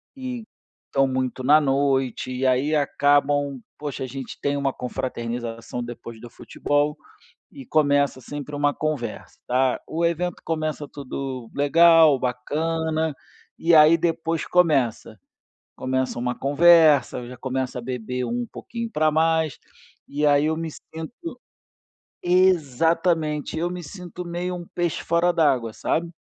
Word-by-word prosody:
e 255 -3 -5 0.5
tão 135 0 +3
muito 130 0 -2
na 150 +4 +6
noite, 135 -3 0
e 130 +1 -2
aí 130 +4 +2
acabam, 145 -1 +2 0.2
poxa, 145 -3 -5
a - - -7
gente 130 0 -7
tem 140 0 0
uma 140 -1 0
confraternização 120 -1 -4
depois 115 -1 -9
do 120 - -10
futebol 145 +4 -1 0.5
e 135 -2 -11
começa 145 -2 +2
sempre 145 +3 -8
uma 145 0 +1
conversa, 145 -8 -4
tá. 130 +1 +1
O 165 +2 -1
evento 170 +1 -1
começa 155 -2 -2
tudo 130 -3 -6
legal 160 0 +6
bacana, 155 +5 -1 0.4
e 170 +1 +2
aí 155 +1 +7
depois 165 -1 -1
começa. 135 -11 +1 0.6
Começa 130 0 -1
uma 125 0 -2
conversa, 145 -4 +4
já 125 +1 -9
começa 130 0 -3
a - - -6
beber 125 0 -4
um 120 0 -2
pouquinho 230 -1 -6
pra 155 -3 +2
mais, 160 -2 +1 0.5
e 145 +2 -2
aí 145 0 +4
eu 160 0 0
me 165 -1 -4
sinto 245 - -9 0.8
exatamente, 165 -3 +2
eu 175 +2 -1
me 180 0 -6
sinto 180 +2 -8
meio 175 +1 -3
um 175 -1 -8
peixe 175 -2 -1
fora 170 +1 +2
d'água, 130 -9 +2
sabe. 165 +8 -2
145 Hz, 135 wpm, -23 LUFS, 130-165 Hz, 0.8 s, aí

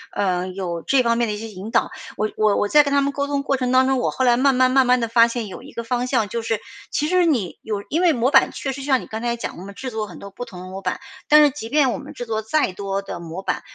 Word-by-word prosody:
嗯， 185 -1 -1
有 175 -3 -4
这 270 -2 +2
方 235 -1 +2
面 235 0 +1
的 210 - -2
一 210 - -4
些 225 - -6
引 205 +2 -8
导。 - - +2 0.3
我 215 0 0
我 215 -1 +3
我 205 - +1
在 295 +7 +6
跟 285 - -2
他 280 - +4
们 280 0 0
沟 280 0 -2
通 280 -1 -1
过 275 -1 0
程 250 -1 -1
当 260 0 +5
中， 265 -1 +2
我 - - 0
后 260 - 0
来 240 -1 +4
慢 270 0 +3
慢 255 0 +4
慢 265 0 +4
慢 250 0 +4
地 230 - -1
发 230 0 +5
现 235 -2 -4
有 190 - -9
一 - - -13
个 235 - -5
方 245 +2 -1
向， 235 -5 +1
就 230 +3 -3
是 225 -1 -1 0.3
其 300 - -1
实 360 +1 +3
你 240 - 0
有 210 -2 -4
因 325 +4 0
为 355 -2 +5
模 250 +1 +1
板 - - +5
确 270 - -4
实 275 +1 -7
像 265 -2 +1
你 - - -11
刚 220 +1 -5
才 235 0 -1
讲 235 - -6
的 175 - -9
嘛， 200 - -9
制 260 +5 -6
作 220 -1 -3
很 175 -5 -11
多 200 - -9
不 245 - -7
同 185 -7 -10
的 - - -9
模 190 +1 -7
板。 - - -2 0.3
但 300 0 +7
是 295 - +6
即 230 -5 -7
便 285 -2 +3
我 - - -3
们 - - -10
制 245 - -6
作 220 -1 -2
再 220 +3 +1
多 195 0 -3
的 195 - -7
模 170 +3 -7
板， - - -2
235 Hz, 345 characters per minute, -22 LUFS, 205-270 Hz, 0.3 s, 但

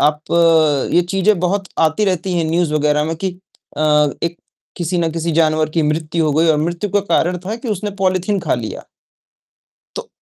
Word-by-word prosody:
आप 150 0 +2 0.7
ये 175 - +4
चीजें 195 0 +2
बहुत 190 +1 -1
आती 160 +7 +2
रहती 185 -1 -1
हैं 165 - 0
न्यूज 170 -1 +1
वगैरह 150 0 +1
में 165 +1 -2
कि 190 +3 -2 0.5
अ, - - -3 0.4
एक 170 0 -2 0.4
किसी 175 +1 -2
न 165 -1 0
किसी 165 0 -2
जानवर 155 -1 +2
की 160 0 0
मृत्यु 160 +2 -1
हो 150 - +1
गई 160 +3 +2
और 155 - +4
मृत्यु 170 +5 -2
का 205 - +2
कारण 180 -1 0
था 215 - -2
कि 240 -1 -7
उसने 205 0 -2
पॉलीथीन 185 +2 +1
खा 165 - 0
लिया। 115 -3 -6 1.1
तो, - - -7
170 Hz, 190 wpm, -18 LUFS, 155-190 Hz, 1.1 s, ये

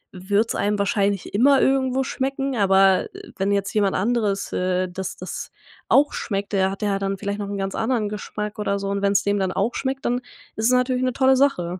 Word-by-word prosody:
wird's 200 +5 0
einem 205 0 0
wahrscheinlich 200 -1 0
immer 270 +6 +5
irgendwo 265 -1 +2
schmecken, 270 0 -2
aber 195 -2 +4 0.3
wenn 195 +1 0
jetzt 200 -1 -1
jemand 200 -3 +1
anderes, 210 -1 0
äh, 185 0 0
das 185 +1 -5
das - - -6 0.4
auch 290 +1 +4
schmeckt, 200 -1 -3
der 190 -1 +2
hat 195 +2 -6
ja 200 -1 0
dann 195 0 -2
vielleicht 200 +1 -4
noch 205 - -4
'n 205 - -4
ganz 195 0 -3
anderen 225 -2 0
Geschmack 210 0 -5
oder 200 -1 0
so 200 0 -4
und 200 0 -2
wenn's 200 -1 +2
dem 200 0 +1
dann 190 -1 0
auch 205 +6 -1
schmeckt, 270 0 -3
dann 245 - +1 0.4
ist 220 - -2
es - - +5
natürlich 250 0 +2
'ne 255 -1 0
tolle 265 +1 +4
Sache. 185 -10 +1
205 Hz, 210 wpm, -22 LUFS, 195-250 Hz, 0.4 s, immer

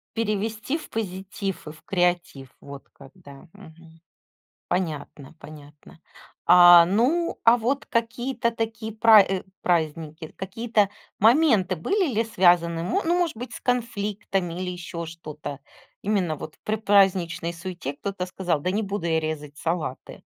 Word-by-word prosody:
перевести 220 +4 -2
в - - -11
позитив, 195 -2 -5
и - - -6
в 155 0 -18
креатив, 175 -7 -1
вот 140 -1 -11
как, 135 -1 -15
да. 145 -3 -15
Мгм. 165 0 -16 0.7
Понятно. 155 -5 -4
Понятно. 150 0 -14 0.5
А, 175 -1 +9
ну, 255 - +1
а 230 +1 +7
вот 265 +6 -1
какие-то 235 0 -1
такие 225 -1 -4
пра 220 -2 +6 0.3
праздники, 160 -1 -1
какие-то 210 +2 0 0.3
моменты 225 - +4
были 335 - 0
ли 225 +2 +1
связаны, 175 -5 +2
мо 390 - 0
ну 345 +2 +2
может 345 -8 0
быть 245 +3 -7
с - - -8
конфликтами 205 -7 -2
или 180 - -3
ещё 175 -1 -6
что-то? 150 -3 -8 0.4
Именно 190 -6 0
вот 155 - -9
в - - -31
предпраздничной 190 -5 +2
суете 170 -4 -6
кто-то 190 +3 -4
сказал: 180 -4 -2
"Да 180 - -1
не 210 +4 -1
буду 200 -3 -3
я 160 -1 +2
резать 150 -2 -5
салаты." 165 -6 -4
185 Hz, 140 wpm, -24 LUFS, 165-225 Hz, 0.7 s, А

